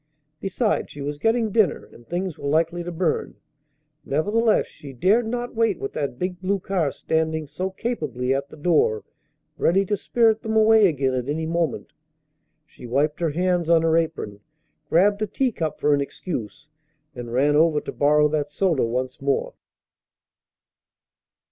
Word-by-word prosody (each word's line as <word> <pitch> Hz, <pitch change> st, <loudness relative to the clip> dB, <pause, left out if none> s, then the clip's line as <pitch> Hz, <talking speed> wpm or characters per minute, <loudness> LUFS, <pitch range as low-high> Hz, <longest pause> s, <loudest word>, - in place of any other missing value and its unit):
Besides, 210 Hz, +3 st, -1 dB
she 145 Hz, -, -9 dB
was 145 Hz, +1 st, -4 dB
getting 225 Hz, +1 st, +1 dB
dinner, 210 Hz, -6 st, +2 dB
and 120 Hz, -, -17 dB
things 180 Hz, -1 st, -3 dB
were 140 Hz, -, -6 dB
likely 165 Hz, +3 st, +1 dB
to 175 Hz, -, -5 dB
burn. 170 Hz, -1 st, -1 dB, 0.7 s
Nevertheless, 210 Hz, +10 st, +1 dB
she 140 Hz, -2 st, -12 dB
dared 210 Hz, -, +2 dB
not 245 Hz, +1 st, -3 dB
wait 225 Hz, 0 st, +1 dB
with 410 Hz, 0 st, -5 dB
that 140 Hz, -4 st, -3 dB
big 180 Hz, +3 st, -4 dB
blue 195 Hz, +2 st, 0 dB
car 180 Hz, -6 st, -1 dB
standing 160 Hz, +1 st, -1 dB
so 180 Hz, +6 st, -4 dB
capably 150 Hz, -, -2 dB
at 140 Hz, +1 st, -3 dB
the -, -, -13 dB
door, 150 Hz, -9 st, +2 dB, 0.6 s
ready 195 Hz, +3 st, +3 dB
to 205 Hz, -, 0 dB
spirit 225 Hz, +2 st, +2 dB
them 220 Hz, -1 st, -3 dB
away 220 Hz, -1 st, +6 dB
again 135 Hz, -5 st, 0 dB
at 125 Hz, +1 st, -2 dB
any 160 Hz, +2 st, -1 dB
moment. 165 Hz, -3 st, -2 dB, 0.7 s
She 125 Hz, -, -12 dB
wiped 145 Hz, +6 st, 0 dB
her 170 Hz, -2 st, +1 dB
hands 175 Hz, +1 st, 0 dB
on 165 Hz, -1 st, +5 dB
her 165 Hz, 0 st, +3 dB
apron, 160 Hz, -11 st, -2 dB, 0.5 s
grabbed 200 Hz, +5 st, +3 dB
a 215 Hz, -, 0 dB
teacup 205 Hz, -, -2 dB
for 150 Hz, -, +3 dB
an 140 Hz, -, +2 dB
excuse, 140 Hz, -, -6 dB, 0.5 s
and 120 Hz, -1 st, -7 dB
ran 140 Hz, +4 st, +2 dB
over 155 Hz, 0 st, +4 dB
to -, -, -6 dB
borrow 150 Hz, +1 st, +3 dB
that 145 Hz, -1 st, -1 dB
soda 170 Hz, -4 st, +1 dB
once 125 Hz, +3 st, -3 dB
more. 140 Hz, 0 st, 0 dB
160 Hz, 160 wpm, -23 LUFS, 145-195 Hz, 0.7 s, away